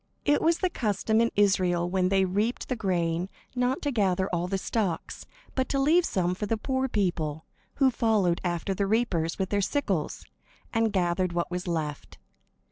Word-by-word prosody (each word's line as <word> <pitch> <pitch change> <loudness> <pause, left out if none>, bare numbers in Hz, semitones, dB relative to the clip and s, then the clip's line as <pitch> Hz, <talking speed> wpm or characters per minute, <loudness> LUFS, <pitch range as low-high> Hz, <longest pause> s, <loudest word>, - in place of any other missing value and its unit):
It 290 - +3
was 330 +1 +3
the 370 - 0
custom 220 - +1
in 230 - +3
Israel 185 -4 +2
when 185 0 +1
they 190 0 +3
reaped 205 +6 -1
the 255 - 0
grain 175 -4 -1 0.3
not 250 +2 0
to 290 - 0
gather 190 -5 +1
all 175 0 -1
the 195 +1 -1
stalks, 190 -4 -3 0.3
but 260 -1 -1
to 275 - 0
leave 325 +6 +4
some 180 -1 0
for 205 +3 -4
the 225 - 0
poor 260 +3 -1
people, 165 - -1 0.3
who 270 -2 +4
followed 210 -7 +1
after 175 +1 -1
the 195 +1 -1
reapers 195 -7 0
with 190 -1 -1
their 205 -1 +1
sickles, 195 - -1 0.5
and 225 -1 +2
gathered 180 -1 0
what 170 +1 -1
was 180 0 -3
left. 155 -4 -3
195 Hz, 180 wpm, -27 LUFS, 175-230 Hz, 0.5 s, leave